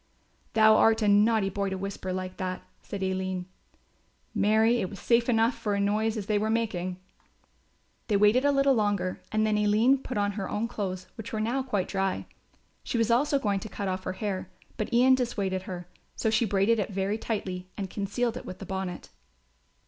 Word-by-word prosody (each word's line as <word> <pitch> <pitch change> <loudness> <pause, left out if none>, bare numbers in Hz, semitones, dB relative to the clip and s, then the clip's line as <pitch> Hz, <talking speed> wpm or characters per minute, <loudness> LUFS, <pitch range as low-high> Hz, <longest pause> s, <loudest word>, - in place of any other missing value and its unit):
"Thou 220 0 +6
art 225 0 +4
a - - +2
naughty 205 0 +4
boy 200 0 -1
to 190 - -3
whisper 190 -1 -4
like 185 0 -4
that," 185 -1 -4 0.2
said 200 -1 -5
Aline. 190 -1 -2 0.9
"Marry, 220 +3 +3
it 185 - -2
was 200 - -9
safe 235 +3 +2
enough 225 +1 +3
for 205 -3 -2
such - - 0
a - - +2
noise 215 +2 0
as 205 - -4
they 210 0 +1
were 215 +1 0
making." 190 -6 -1 1.1
They 210 -3 +2
waited 210 +5 +4
a 285 - +4
little 275 0 +4
longer 205 -5 0
and 215 0 +2
then 215 -1 +2
Aline 220 +6 +4
put 255 -2 -5
on 205 0 +1
her 200 -1 -4
own 220 +2 -1
clothes 185 -5 -4
which 225 -1 -7
were 220 - -2
now 235 +5 0
quite 210 -8 -1
dry. 195 -1 -1 0.6
She - - -2
was 230 0 +2
also 280 +4 +3
going 205 -7 0
to 220 - -8
cut 200 - -4
off 185 0 -3
her - - -2
hair, 190 -2 -3 0.3
but 215 - -3
Ian 250 +2 +5
dissuaded 205 -7 0
her; 180 -3 -7 0.3
so 220 - 0
she 230 - +3
braided 205 +3 +2
it 205 - -1
very 195 +2 -1
tightly 185 -5 -4
and 195 - -3
concealed 220 +5 -2
it - - -7
with 185 - -7
the 195 - -8
bonnet. 190 -1 -5
210 Hz, 200 wpm, -28 LUFS, 190-225 Hz, 1.1 s, Thou